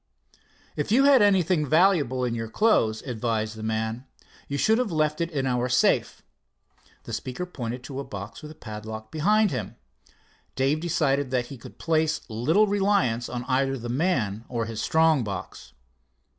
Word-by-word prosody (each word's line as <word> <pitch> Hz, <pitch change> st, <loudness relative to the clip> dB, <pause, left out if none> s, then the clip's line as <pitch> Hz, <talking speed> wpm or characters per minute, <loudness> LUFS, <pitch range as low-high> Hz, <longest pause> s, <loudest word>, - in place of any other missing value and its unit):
"If 150 Hz, +6 st, -3 dB
you 260 Hz, +5 st, +5 dB
had 275 Hz, -3 st, +6 dB
anything 185 Hz, -5 st, +3 dB
valuable 150 Hz, -5 st, +3 dB
in 120 Hz, -, -1 dB
your 115 Hz, -1 st, -4 dB
clothes," 115 Hz, -, +2 dB
advised 110 Hz, -3 st, -2 dB
the 110 Hz, -, -9 dB
man, 110 Hz, +3 st, -2 dB, 0.4 s
"you 140 Hz, -, -3 dB
should 220 Hz, +9 st, +3 dB
have 245 Hz, -6 st, -1 dB
left 155 Hz, 0 st, 0 dB
it 170 Hz, -, 0 dB
in 140 Hz, -5 st, -2 dB
our 125 Hz, -1 st, 0 dB
safe." 125 Hz, -, +2 dB, 0.8 s
The -, -, -8 dB
speaker 130 Hz, +8 st, -4 dB
pointed 125 Hz, -7 st, -6 dB
to 135 Hz, +1 st, -6 dB
a -, -, -3 dB
box 105 Hz, +2 st, -8 dB
with 150 Hz, -, -9 dB
a 155 Hz, -, -11 dB
padlock 110 Hz, -3 st, -8 dB
behind 210 Hz, +6 st, +2 dB
him. -, -, -4 dB, 0.8 s
Dave 135 Hz, +4 st, +1 dB
decided 145 Hz, -5 st, 0 dB
that 125 Hz, -1 st, 0 dB
he -, -, -9 dB
could -, -, -13 dB
place 160 Hz, -1 st, 0 dB
little 150 Hz, -, +2 dB
reliance 195 Hz, -, +1 dB
in 125 Hz, 0 st, -4 dB
either 135 Hz, +1 st, 0 dB
the 120 Hz, -1 st, -6 dB
man 120 Hz, -, 0 dB
or 115 Hz, -2 st, -2 dB
his 115 Hz, -1 st, -5 dB
strong 160 Hz, -4 st, +3 dB
box. 95 Hz, -, -7 dB
135 Hz, 170 wpm, -25 LUFS, 115-165 Hz, 0.8 s, had